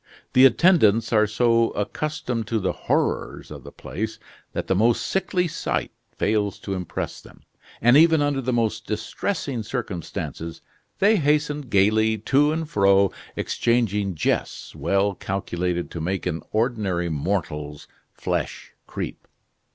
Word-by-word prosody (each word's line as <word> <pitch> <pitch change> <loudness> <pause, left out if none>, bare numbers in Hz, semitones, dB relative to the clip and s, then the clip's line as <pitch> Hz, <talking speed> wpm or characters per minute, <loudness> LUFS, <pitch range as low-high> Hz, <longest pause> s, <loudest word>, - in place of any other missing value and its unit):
The 130 +1 +7
attendants 115 - +4
are 110 -1 +4
so 115 +1 +3
accustomed 120 0 -3
to 115 - 0
the 95 -3 0
horrors - - -1
of - - -9
the - - -10
place 110 +2 -5 0.3
that - - -3
the - - +1
most 115 +5 +2
sickly 185 -2 0
sight 155 - -2 0.3
fails 105 -2 0
to 100 - -4
impress 90 -2 -4
them; - - -17 0.4
and 120 +2 +6
even 160 +1 +6
under 145 -2 +1
the 130 0 -1
most 110 -2 -1
distressing 120 - -3
circumstances, 90 -7 -5 0.3
they 210 +2 +4
hasten 150 -1 +1
gaily 110 +3 +3
to 140 +7 +3
and 160 0 -2
fro, 100 -4 +4 0.2
exchanging 105 -5 0
jests - - -2
well 100 +1 +1
calculated 90 -2 -3
to 85 - -5
make 95 +4 -2
an 85 -3 -2
ordinary 105 -7 0
mortal's 75 -3 -3 0.2
flesh - - -4
creep. - - -6
110 Hz, 135 wpm, -24 LUFS, 95-130 Hz, 0.4 s, The